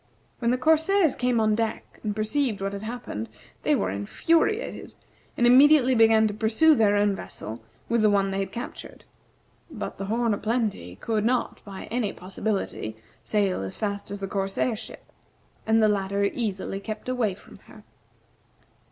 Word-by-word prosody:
When 235 Hz, -, +1 dB
the 250 Hz, -, +2 dB
corsairs 320 Hz, +4 st, +3 dB
came 250 Hz, -2 st, +1 dB
on 215 Hz, -1 st, +3 dB
deck 225 Hz, 0 st, -3 dB
and 210 Hz, -2 st, -3 dB
perceived 220 Hz, +1 st, 0 dB
what 195 Hz, 0 st, -3 dB
had 200 Hz, -, -5 dB
happened, 215 Hz, -, -5 dB, 0.3 s
they -, -, +2 dB
were 95 Hz, -1 st, -1 dB
infuriated, 325 Hz, -, 0 dB, 0.4 s
and 240 Hz, -, +3 dB
immediately 260 Hz, +1 st, +6 dB
began 225 Hz, -2 st, +5 dB
to 210 Hz, -, -3 dB
pursue 225 Hz, +10 st, +4 dB
their 215 Hz, -6 st, +3 dB
own 205 Hz, -1 st, +2 dB
vessel 110 Hz, -, -8 dB, 0.3 s
with 230 Hz, -1 st, +1 dB
the 215 Hz, -, +5 dB
one 195 Hz, -1 st, +2 dB
they 195 Hz, -, -2 dB
had 195 Hz, -, -3 dB
captured. 240 Hz, -, -8 dB, 0.7 s
But -, -, -6 dB
the 195 Hz, -, -3 dB
"Horn 230 Hz, +2 st, +1 dB
o' 205 Hz, -, -3 dB
Plenty" 215 Hz, -, -2 dB
could 215 Hz, -, -1 dB
not, 245 Hz, +2 st, 0 dB
by 195 Hz, -2 st, -8 dB
any 230 Hz, -4 st, -1 dB
possibility, 190 Hz, -, -3 dB, 0.2 s
sail 200 Hz, -, 0 dB
as 95 Hz, 0 st, -5 dB
fast 200 Hz, -1 st, -3 dB
as 200 Hz, 0 st, -5 dB
the 195 Hz, -, -4 dB
corsair 195 Hz, +4 st, -1 dB
ship, -, -, -10 dB, 0.6 s
and 220 Hz, 0 st, +4 dB
the -, -, +6 dB
latter 200 Hz, -1 st, 0 dB
easily 200 Hz, -2 st, -2 dB
kept 215 Hz, +3 st, -7 dB
away 240 Hz, -6 st, 0 dB
from -, -, -16 dB
her. -, -, -15 dB
215 Hz, 170 wpm, -26 LUFS, 195-240 Hz, 0.7 s, immediately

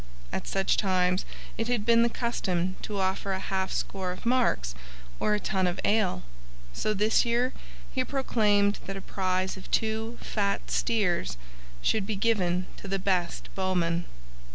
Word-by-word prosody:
At -, -, -3 dB
such 195 Hz, 0 st, +1 dB
times 185 Hz, -1 st, +2 dB, 0.3 s
it 225 Hz, -, 0 dB
had 240 Hz, -4 st, 0 dB
been 230 Hz, 0 st, +6 dB
the 235 Hz, -, +4 dB
custom 185 Hz, -7 st, -1 dB
to 205 Hz, -2 st, -3 dB
offer 190 Hz, +1 st, 0 dB
a 190 Hz, -, -2 dB
half 190 Hz, -1 st, -1 dB
score 190 Hz, -2 st, -2 dB
of 180 Hz, -, -8 dB
marks 235 Hz, -, +2 dB, 0.5 s
or 210 Hz, -, +2 dB
a -, -, -1 dB
tun 190 Hz, -2 st, +1 dB
of 180 Hz, +1 st, -2 dB
ale, 205 Hz, -, +2 dB, 0.5 s
so 215 Hz, -, 0 dB
this 210 Hz, +2 st, +4 dB
year 245 Hz, +2 st, +1 dB, 0.4 s
he 260 Hz, -, +1 dB
proclaimed 210 Hz, -7 st, +2 dB
that 195 Hz, 0 st, -4 dB
a -, -, -6 dB
prize 185 Hz, 0 st, -1 dB
of 185 Hz, -, -11 dB
two 220 Hz, +1 st, 0 dB
fat 200 Hz, -2 st, -1 dB
steers 180 Hz, -, +1 dB, 0.5 s
should 210 Hz, -3 st, +2 dB
be 220 Hz, -, -1 dB
given 185 Hz, -4 st, +1 dB
to -, -, -9 dB
the 195 Hz, 0 st, 0 dB
best 185 Hz, -3 st, -1 dB
bowman. 175 Hz, -3 st, 0 dB
195 Hz, 160 wpm, -28 LUFS, 185-220 Hz, 0.5 s, been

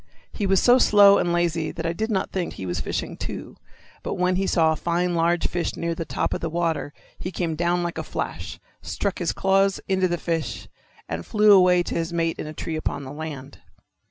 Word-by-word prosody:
He 205 Hz, -, -2 dB
was 190 Hz, -1 st, +4 dB
so 245 Hz, +1 st, +5 dB
slow 200 Hz, -3 st, +7 dB
and 175 Hz, -, 0 dB
lazy 170 Hz, -2 st, 0 dB
that -, -, -6 dB
I 165 Hz, -, 0 dB
did 220 Hz, +6 st, -2 dB
not 195 Hz, -4 st, -1 dB
think 185 Hz, -3 st, -3 dB
he 95 Hz, -, -7 dB
was 90 Hz, 0 st, -2 dB
fishing -, -, -3 dB
too. -, -, -7 dB, 0.5 s
But -, -, -3 dB
when 180 Hz, 0 st, +1 dB
he 195 Hz, +1 st, 0 dB
saw 160 Hz, -3 st, +3 dB
a -, -, 0 dB
fine 175 Hz, +2 st, 0 dB
large 170 Hz, +1 st, +1 dB
fish 175 Hz, -1 st, -1 dB
near 170 Hz, 0 st, -1 dB
the 165 Hz, 0 st, -5 dB
top -, -, -1 dB
of -, -, -4 dB
the 165 Hz, -, -2 dB
water 165 Hz, -3 st, -1 dB, 0.3 s
he 185 Hz, -, -4 dB
came 170 Hz, -3 st, -2 dB
down 175 Hz, +2 st, 0 dB
like 170 Hz, -1 st, -3 dB
a -, -, -3 dB
flash, -, -, -5 dB, 0.2 s
struck 200 Hz, -2 st, -3 dB
his 175 Hz, -, 0 dB
claws 195 Hz, 0 st, +2 dB
into 190 Hz, -1 st, +2 dB
the 175 Hz, 0 st, -1 dB
fish, 165 Hz, -2 st, -3 dB, 0.4 s
and 80 Hz, +1 st, -4 dB
flew 210 Hz, -, +4 dB
away 180 Hz, -2 st, +6 dB
to -, -, -5 dB
his 165 Hz, 0 st, -2 dB
mate 165 Hz, -1 st, -1 dB
in -, -, -4 dB
a -, -, -6 dB
tree 160 Hz, -, -4 dB
upon 145 Hz, -2 st, -3 dB
the 130 Hz, -, -8 dB
land. 145 Hz, -3 st, -7 dB
175 Hz, 225 wpm, -24 LUFS, 165-190 Hz, 0.5 s, slow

